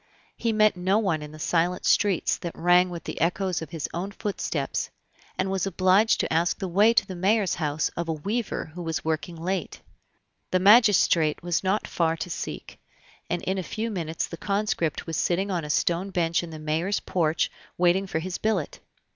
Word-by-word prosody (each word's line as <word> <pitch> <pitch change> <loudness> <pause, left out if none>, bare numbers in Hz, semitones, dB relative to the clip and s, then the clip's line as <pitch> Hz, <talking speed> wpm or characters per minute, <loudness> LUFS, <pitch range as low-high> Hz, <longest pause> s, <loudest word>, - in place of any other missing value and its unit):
He 230 - -1
met 215 -2 +4
no 185 +3 +1
one 190 -8 0
in 150 0 -8
the 155 - -11
silent 170 +3 0
streets 200 -5 +2
that 170 -2 -6
rang 180 +1 +4
with 170 -1 -7
the - - -6
echoes 180 +2 0
of 160 - -7
his 160 -2 -4
own 180 +4 -3
footsteps, 205 0 -3 0.5
and 190 +1 0
was 195 0 0
obliged 190 +4 +3
to - - -2
ask 170 +2 +1
the 190 - -4
way 205 +6 +4
to 230 - +3
the 190 - -7
mayor's 195 +2 +2
house 155 -1 -1
of 170 -1 -5
a - - +1
weaver 200 +1 -3
who 180 - -7
was 165 0 -3
working 160 +1 -2
late. 175 +2 -3 0.7
The 185 - +2
magistrate 190 -7 +5
was 175 0 0
not 195 +3 0
far 165 -1 0
to 165 +2 -5
seek, - - -6 0.5
and 175 0 -2
in 190 0 -1
a - - -1
few 220 +5 -4
minutes 165 -5 -2
the 170 - -8
conscript 200 -6 -1
was 165 -2 -3
sitting 190 +3 0
on 175 -3 -1
a 150 - -6
stone 175 +5 +1
bench 170 -3 +1
in 170 - -7
the 160 - -8
mayor's 160 +6 -1
porch 165 -3 0 0.3
waiting 180 +2 +3
for 175 - -2
his 180 +3 -4
billet. 210 -8 -1
180 Hz, 195 wpm, -26 LUFS, 165-195 Hz, 0.7 s, magistrate